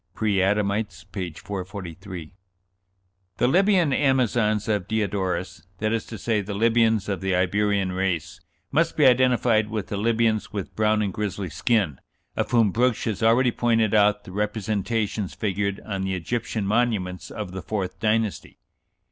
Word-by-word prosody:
("Preadamites," 100 Hz, -2 st, 0 dB
p. 90 Hz, -4 st, -4 dB
443.) 95 Hz, -1 st, -7 dB, 1.0 s
"The 120 Hz, -, +3 dB
Libyan 180 Hz, -1 st, +3 dB
Amazons 120 Hz, -6 st, +2 dB
of 105 Hz, -5 st, 0 dB
Diodorus 95 Hz, -5 st, -2 dB, 0.2 s
that 110 Hz, +2 st, -1 dB
is 115 Hz, -, -2 dB
to 110 Hz, -, -7 dB
say, 105 Hz, +1 st, 0 dB
the 100 Hz, +1 st, -5 dB
Libyans 115 Hz, -1 st, +3 dB
of 100 Hz, -1 st, -2 dB
the 95 Hz, -1 st, 0 dB
Iberian 100 Hz, +1 st, +1 dB
race 90 Hz, -4 st, -2 dB, 0.3 s
must 165 Hz, +2 st, +1 dB
be 150 Hz, -, +5 dB
identified 125 Hz, -4 st, +4 dB
with 110 Hz, -3 st, -4 dB
the 100 Hz, -, -2 dB
Libyans 110 Hz, 0 st, +1 dB
with 100 Hz, -3 st, -5 dB
brown 110 Hz, 0 st, +2 dB
and 100 Hz, -3 st, -2 dB
grizzly 100 Hz, -4 st, -3 dB
skin, 90 Hz, -, 0 dB, 0.4 s
of -, -, -1 dB
whom 115 Hz, -4 st, +3 dB
Brugsch 125 Hz, 0 st, +1 dB
has 110 Hz, -1 st, -2 dB
already 120 Hz, +3 st, +4 dB
pointed 115 Hz, -3 st, +1 dB
out 105 Hz, -1 st, +4 dB
the 95 Hz, -, -11 dB
representations 105 Hz, 0 st, -2 dB
figured 100 Hz, -1 st, -1 dB
on 100 Hz, -3 st, -3 dB
the 95 Hz, 0 st, -1 dB
Egyptian 110 Hz, +3 st, -3 dB
monuments 105 Hz, -4 st, 0 dB
of 105 Hz, -4 st, -6 dB
the 95 Hz, 0 st, -6 dB
fourth 95 Hz, -3 st, -4 dB
dynasty." 110 Hz, -1 st, -1 dB
105 Hz, 150 wpm, -24 LUFS, 95-115 Hz, 1.0 s, be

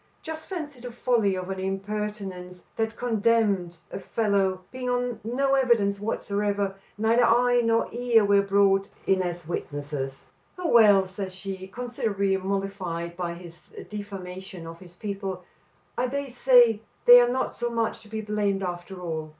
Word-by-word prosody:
"Just 320 Hz, 0 st, -7 dB
fancy 305 Hz, -8 st, -5 dB
the 245 Hz, 0 st, -7 dB
folly 230 Hz, -5 st, +1 dB
of 185 Hz, +1 st, -4 dB
an 190 Hz, -, -4 dB
impertinence 195 Hz, -2 st, -4 dB
that 225 Hz, 0 st, -1 dB
condemned 215 Hz, -7 st, +1 dB
a -, -, -5 dB
fellow 195 Hz, -3 st, 0 dB
being 255 Hz, -1 st, -4 dB
on 245 Hz, -1 st, -1 dB
no 270 Hz, +5 st, 0 dB
evidence 230 Hz, -7 st, +3 dB
whatsoever; 205 Hz, -1 st, -1 dB, 0.2 s
neither 225 Hz, +3 st, +3 dB
eye 245 Hz, +1 st, +4 dB
nor 230 Hz, 0 st, +2 dB
ear 235 Hz, -3 st, +3 dB
were 200 Hz, 0 st, +5 dB
brought 195 Hz, 0 st, +3 dB, 0.2 s
in 190 Hz, -1 st, +3 dB
as 175 Hz, -2 st, -4 dB
witnesses." 145 Hz, -4 st, -4 dB, 0.3 s
"Oh, 355 Hz, -2 st, -2 dB
well," 205 Hz, -4 st, +6 dB
says 190 Hz, 0 st, -6 dB
she, 190 Hz, 0 st, -6 dB
considerably 200 Hz, -3 st, -1 dB
mollified 190 Hz, -3 st, -3 dB
by 175 Hz, -1 st, -3 dB
his 170 Hz, -1 st, -13 dB, 0.2 s
defamation 190 Hz, -3 st, -7 dB
of 165 Hz, 0 st, -9 dB
his 175 Hz, -2 st, -15 dB
people, 195 Hz, -2 st, -5 dB, 0.5 s
"I 250 Hz, -, 0 dB
dare 280 Hz, +2 st, -3 dB
say 245 Hz, -3 st, +5 dB, 0.2 s
they 245 Hz, 0 st, +10 dB
are 240 Hz, -, +3 dB
not 260 Hz, +1 st, -1 dB
so 240 Hz, -, -2 dB
much 230 Hz, -1 st, -1 dB
to 220 Hz, -, -16 dB
be 220 Hz, 0 st, -4 dB
blamed 205 Hz, -2 st, -1 dB
after 180 Hz, +1 st, -5 dB
all. 160 Hz, -3 st, -4 dB
200 Hz, 155 wpm, -26 LUFS, 185-235 Hz, 0.5 s, they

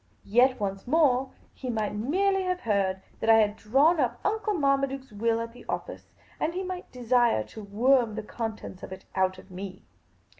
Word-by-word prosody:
Yet 250 Hz, +4 st, +4 dB
once 195 Hz, 0 st, -3 dB
more, 270 Hz, -3 st, +3 dB, 0.2 s
he 255 Hz, -, -6 dB
might 215 Hz, -3 st, -1 dB
merely 380 Hz, -, +1 dB
have 365 Hz, 0 st, -1 dB
heard 195 Hz, -4 st, 0 dB, 0.2 s
that 225 Hz, -, -1 dB
I 225 Hz, -, +9 dB
had 210 Hz, -1 st, +3 dB
drawn 280 Hz, +11 st, +3 dB
up 250 Hz, -4 st, 0 dB
Uncle 425 Hz, 0 st, 0 dB
Marmaduke's 275 Hz, -3 st, 0 dB
will 225 Hz, +2 st, 0 dB
at 230 Hz, 0 st, -5 dB
the 245 Hz, -, -13 dB
office, -, -, -5 dB, 0.3 s
and 330 Hz, +2 st, -1 dB
he 375 Hz, -, -2 dB
might 370 Hz, -1 st, -6 dB
desire 240 Hz, -, +2 dB
to 210 Hz, -, -10 dB
worm 230 Hz, +2 st, +2 dB
the 220 Hz, -, -4 dB
contents 220 Hz, -4 st, -6 dB
of -, -, -9 dB
it 190 Hz, 0 st, -9 dB
out 185 Hz, 0 st, +1 dB
of 185 Hz, -, -15 dB
me. 185 Hz, 0 st, -8 dB
235 Hz, 185 wpm, -27 LUFS, 205-275 Hz, 0.3 s, I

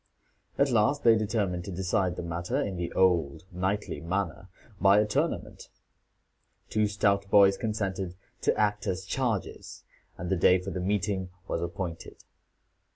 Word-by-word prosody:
At 140 Hz, -1 st, +3 dB
last 120 Hz, +6 st, +2 dB
they 115 Hz, -1 st, +7 dB
determined 100 Hz, -5 st, -1 dB
to 100 Hz, -, -6 dB
decide 95 Hz, 0 st, 0 dB
the -, -, -5 dB
matter 85 Hz, +10 st, -2 dB
in 100 Hz, -10 st, -2 dB
the 85 Hz, -1 st, -3 dB
old 85 Hz, -5 st, +2 dB
knightly 95 Hz, -2 st, -2 dB
manner, 95 Hz, +1 st, -3 dB, 0.3 s
by 100 Hz, +1 st, +6 dB
a 105 Hz, -, +3 dB
tournament. 105 Hz, -, -2 dB, 1.0 s
Two 110 Hz, -1 st, +2 dB
stout 100 Hz, -1 st, +1 dB
boys 100 Hz, -1 st, +6 dB
consented 95 Hz, -5 st, -3 dB, 0.3 s
to -, -, +2 dB
act 105 Hz, -1 st, 0 dB
as 95 Hz, 0 st, -2 dB
chargers, 115 Hz, -1 st, -3 dB, 0.3 s
and 90 Hz, +1 st, -5 dB
the -, -, +3 dB
day 90 Hz, +2 st, +5 dB
for 95 Hz, +2 st, -6 dB
the 95 Hz, -, -4 dB
meeting 95 Hz, -1 st, -1 dB, 0.2 s
was -, -, -2 dB
appointed. 85 Hz, 0 st, -6 dB
95 Hz, 150 wpm, -28 LUFS, 90-105 Hz, 1.0 s, they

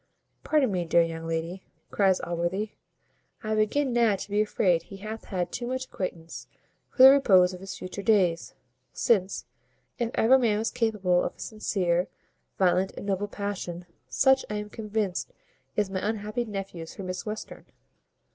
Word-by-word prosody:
"Pardon 290 Hz, -7 st, +2 dB
me, 180 Hz, -2 st, 0 dB
dear 170 Hz, 0 st, +4 dB
young 165 Hz, 0 st, -5 dB
lady," 165 Hz, +3 st, -3 dB, 0.3 s
cries 195 Hz, -2 st, +3 dB
Allworthy, 175 Hz, +5 st, -2 dB, 0.7 s
"I 215 Hz, 0 st, -1 dB
begin 240 Hz, +5 st, +1 dB
now 230 Hz, -4 st, +4 dB
to 195 Hz, -, -7 dB
be 205 Hz, +1 st, +3 dB
afraid 185 Hz, -5 st, +2 dB
he 195 Hz, +4 st, -11 dB
hath 215 Hz, +3 st, -7 dB
had 180 Hz, -3 st, -3 dB
too 240 Hz, -, -4 dB
much 260 Hz, +1 st, -2 dB
acquaintance 170 Hz, -7 st, -6 dB, 0.4 s
for 255 Hz, -, +4 dB
the 265 Hz, -, +12 dB
repose 190 Hz, -10 st, +5 dB
of 180 Hz, -, -8 dB
his 195 Hz, +1 st, -7 dB
future 185 Hz, +2 st, -6 dB
days; 190 Hz, -6 st, +2 dB, 0.4 s
since, 195 Hz, -4 st, +1 dB, 0.5 s
if 235 Hz, -1 st, 0 dB
ever 260 Hz, +4 st, +5 dB
man 225 Hz, -4 st, +2 dB
was 225 Hz, +1 st, -1 dB
capable 210 Hz, -7 st, +1 dB
of -, -, -3 dB
a -, -, -29 dB
sincere, 180 Hz, -5 st, -1 dB, 0.5 s
violent, 185 Hz, 0 st, +2 dB
and -, -, -6 dB
noble 200 Hz, 0 st, -1 dB
passion, 195 Hz, -4 st, -5 dB, 0.2 s
such, 265 Hz, 0 st, +4 dB
I 210 Hz, -, -3 dB
am 210 Hz, 0 st, -5 dB
convinced, 215 Hz, -, -3 dB, 0.4 s
is 205 Hz, -2 st, 0 dB
my 190 Hz, -, -1 dB
unhappy 215 Hz, +2 st, -2 dB
nephew's 195 Hz, -6 st, -6 dB
for 195 Hz, -, -7 dB
Miss 185 Hz, +3 st, -5 dB
Western." 215 Hz, +1 st, -7 dB
200 Hz, 165 wpm, -27 LUFS, 180-220 Hz, 0.7 s, the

